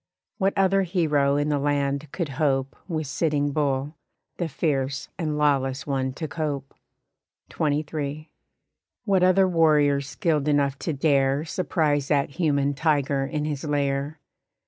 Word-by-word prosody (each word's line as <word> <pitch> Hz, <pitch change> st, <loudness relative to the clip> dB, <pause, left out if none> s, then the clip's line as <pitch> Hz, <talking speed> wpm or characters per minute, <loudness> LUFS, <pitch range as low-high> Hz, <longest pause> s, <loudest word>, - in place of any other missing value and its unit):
What 195 Hz, 0 st, +1 dB
other 195 Hz, 0 st, +3 dB
hero 155 Hz, -6 st, +1 dB
in 145 Hz, +1 st, 0 dB
the 145 Hz, -1 st, +1 dB
land 140 Hz, 0 st, -1 dB
could 170 Hz, -5 st, -3 dB
hope 135 Hz, -3 st, +1 dB
With 160 Hz, -4 st, -2 dB
Sitting 145 Hz, 0 st, 0 dB
Bull, 145 Hz, 0 st, -1 dB, 0.4 s
the 175 Hz, -, -1 dB
fierce 135 Hz, -2 st, -1 dB
and 155 Hz, -3 st, -1 dB
lawless 135 Hz, -3 st, +1 dB
one 135 Hz, -2 st, -1 dB
to 155 Hz, +3 st, -5 dB
cope? 145 Hz, -3 st, -4 dB, 0.8 s
XXIII. 150 Hz, 0 st, -2 dB, 0.7 s
What 195 Hz, -3 st, +2 dB
other 185 Hz, +1 st, +5 dB
warrior 150 Hz, -5 st, +3 dB
skilled 150 Hz, 0 st, -1 dB
enough 140 Hz, -2 st, +1 dB
to 165 Hz, -, -2 dB
dare 140 Hz, 0 st, +2 dB
Surprise 150 Hz, -5 st, 0 dB
that 145 Hz, -2 st, +1 dB
human 145 Hz, -3 st, +1 dB
tiger 140 Hz, -2 st, +1 dB
in 150 Hz, 0 st, -2 dB
his 145 Hz, -3 st, -3 dB
lair? 145 Hz, 0 st, -1 dB
145 Hz, 135 wpm, -25 LUFS, 140-160 Hz, 0.8 s, other